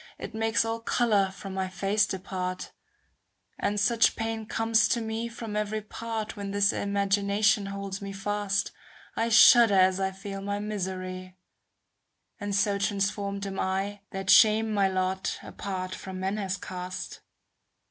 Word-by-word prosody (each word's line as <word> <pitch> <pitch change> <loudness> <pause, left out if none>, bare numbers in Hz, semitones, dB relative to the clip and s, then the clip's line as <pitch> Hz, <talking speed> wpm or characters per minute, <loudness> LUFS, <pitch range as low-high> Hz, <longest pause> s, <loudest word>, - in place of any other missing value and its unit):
It - - -7
makes 225 0 +1
all 225 0 -2
colour 220 -4 +2
from 195 0 -8
my 190 0 -1
face 200 +3 +1
depart; 185 -1 -4 0.9
And 205 0 0
such 230 +3 +3
pain 225 -1 -3
comes 225 0 +2
to 235 - +1
me 225 +1 -3
from 230 -2 -7
every 210 0 -2
part 225 0 -5
When 200 -1 -5
this 200 0 +2
imagination 200 +1 +1
holds 200 0 -5
me 200 0 -5
fast, 200 0 -1
^ - - -24 0.4
I 230 +1 0
shudder 225 -1 +7
as 185 0 +4
I 190 0 +1
feel 195 +1 -7
my 200 +1 -2
misery; 185 -3 -5 1.0
And 205 -1 -3
so 205 0 +2
transformed 200 0 -1
am 195 -1 -5
I, 195 +2 -1
That 195 0 -1
shame 220 0 +6
my 200 -2 +3
lot 185 0 -1
apart 185 -2 -5
from 190 0 -7
men 190 +2 -1
has 195 -2 -2
cast. 185 0 -6
200 Hz, 150 wpm, -27 LUFS, 190-215 Hz, 1.0 s, shudder